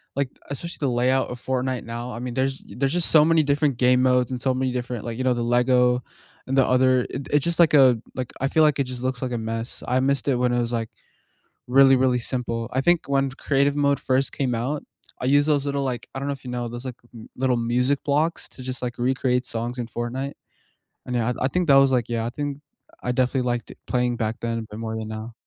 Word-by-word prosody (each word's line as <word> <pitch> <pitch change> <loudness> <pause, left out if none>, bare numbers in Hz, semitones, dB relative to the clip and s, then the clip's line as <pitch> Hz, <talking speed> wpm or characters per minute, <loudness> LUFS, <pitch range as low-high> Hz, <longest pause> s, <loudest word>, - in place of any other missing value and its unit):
like, 140 -1 0 0.2
especially 170 +5 -4
the 145 - 0
layout 125 +2 +1
of 125 0 -7
Fortnite 130 -1 -1
now. 120 +1 -6
I - - -6
mean, 125 0 -5
there's 135 +1 -1
there's 135 +3 -2
just 175 -1 +4
so 155 -2 +7
many 165 -1 +4
different 140 -2 +1
game 125 0 +4
modes 125 -1 +2
and 125 -1 -4
so 130 - +1
many 130 0 -1
different, 125 -2 -4
like 115 -1 -4
you 130 - -2
know, 130 -1 +3
the 120 - -2
LEGO 125 +1 +3 0.5
and 135 +1 -1
the 135 - +5
other 130 0 +3
it 135 +1 -6
it's 145 -1 +3
just, 170 0 0
like, 165 -3 +5
a 130 -5 +6 0.2
like, 130 -2 -4
I 135 - +1
feel 160 +3 +3
like 150 -2 +3
it 140 - +2
just 125 -1 -5
looks 130 -1 -2
like 130 -2 -2
a - - -1
mess. 115 +1 -4
I 125 - +1
missed 140 0 +1
it 135 - +3
when 125 0 +1
it 120 - +1
was, 120 0 -3
like, 115 -2 -2 0.8
really, 135 +1 +6
really 130 -1 +2
simple. 120 -1 -3
I 130 - +1
think 175 +3 +3
when 135 -1 +1
Creative 140 +1 0
mode 140 -1 +2
first 130 +1 0
came 130 -3 0
out, 135 +6 -2 0.4
I - - -4
used 145 +3 +4
those 145 -3 +2
little, 140 0 -1
like 125 -3 -3
I - - -2
don't 140 - -4
know - - 0
if 135 - -12
you 125 - -7
know 120 -1 -3
those, 120 +2 -7
like, 125 -2 -5 0.4
little 130 -1 +1
music 125 +4 0
blocks 150 +4 0
to 130 - -9
just, 130 0 -3
like, 120 -1 -4
recreate 125 0 0
songs 120 +2 -4
in 120 - -3
Fortnite. 125 +4 -4 0.7
And, 125 - -4
yeah, 120 +1 0
I - - +2
I - - +4
think 180 +2 0
that 140 - +6
was, 135 -1 +6
like, 125 -3 +1
yeah 115 -1 -2
I - - -1
think 145 +2 -4 0.4
I 125 - 0
definitely 125 +1 +1
liked 120 -1 -2
it - - -13
playing 125 -1 0
back 110 -1 -2
then 115 0 -2
a - - -4
bit 110 -1 -9
more 110 -1 -4
than 110 -1 -5
now. 110 +2 -6
130 Hz, 255 wpm, -24 LUFS, 120-135 Hz, 0.8 s, so